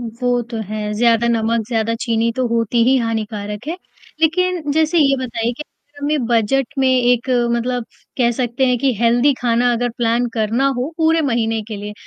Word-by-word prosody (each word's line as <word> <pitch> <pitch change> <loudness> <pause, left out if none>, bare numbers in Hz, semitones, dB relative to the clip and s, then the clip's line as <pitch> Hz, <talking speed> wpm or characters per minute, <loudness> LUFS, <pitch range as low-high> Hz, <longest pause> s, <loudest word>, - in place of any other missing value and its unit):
वो 245 +1 -1
तो 235 - -4
है, 210 0 -3
ज़्यादा 230 +1 +3
नमक, 230 -1 0
ज़्यादा 225 -1 0
चीनी 230 -1 +1
तो 255 -1 +1
होती 230 0 +1
ही 260 +2 +4
हानिकारक 215 -1 -4
है। 335 - -3 0.4
लेकिन 335 -1 +1
जैसे 320 +3 +2
ये 275 -3 +4
बताइए 230 -1 -2
कि 300 - -5
अगर 290 -1 -20
हमें 290 -2 0
बजट 235 +3 +1
में 265 -1 +3
एक 245 -1 +2 0.3
मतलब 245 0 -2 0.3
कह 240 -2 +3
सकते 255 +1 0
हैं 250 -1 +2
कि 270 +1 +1
हेल्दी 240 +4 +3
खाना 245 0 +2
अगर 245 +1 0
प्लान 235 +1 +1
करना 225 +4 +1
हो 265 +6 -3
पूरे 325 0 +2
महीने 230 -5 0
के 215 - -5
लिए, 205 +1 -6
240 Hz, 185 wpm, -18 LUFS, 230-270 Hz, 0.4 s, ही